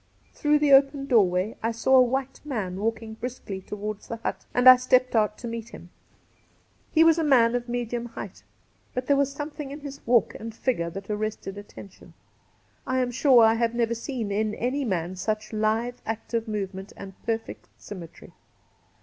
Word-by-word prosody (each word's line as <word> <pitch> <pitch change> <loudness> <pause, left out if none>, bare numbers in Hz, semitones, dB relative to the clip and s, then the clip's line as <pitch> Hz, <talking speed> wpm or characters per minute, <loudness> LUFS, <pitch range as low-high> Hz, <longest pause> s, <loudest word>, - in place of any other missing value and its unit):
Through 300 0 +2
the 295 -1 +3
open 275 0 +5
doorway 205 -5 +2
I 225 - 0
saw 240 +4 +2
a - - +8
white 265 +2 -1
man 210 -11 -3
walking 225 +1 -2
briskly 220 -5 -6
towards 210 +1 -6
the 230 - -4
hut, 230 - -5
and 245 +1 +3
I 255 - +12
stepped 255 0 +2
out 215 -1 +2
to 240 - -7
meet 230 0 -6
him. 175 -5 -12 1.0
He 320 - +5
was 330 0 +5
a - - +1
man 245 -6 +4
of 245 0 -2
medium 240 0 -3
height, 230 - -9 0.5
but 250 0 -2
there 285 - +3
was 280 0 +1
something 295 0 -6
in 290 +2 -8
his 280 -1 -8
walk 240 -1 +3
and 225 0 -8
figure 225 -10 -1
that 195 +4 -7
arrested 210 -2 -3
attention. 205 -1 -12 0.7
I 260 - 0
am 250 -1 0
sure 250 -1 +5
I 225 - +5
have 230 0 0
never 235 -1 +1
seen 235 -3 -4
in 210 +1 0
any 265 +4 -1
man 185 -5 -2
such 215 +3 -3
lithe, 220 +3 0
active 225 +1 -3
move 205 -3 -3
ment 190 +2 -9
and 195 -1 -9
perfect 225 -1 -4
symmetry. 175 -5 -11
230 Hz, 185 wpm, -26 LUFS, 210-255 Hz, 1.0 s, I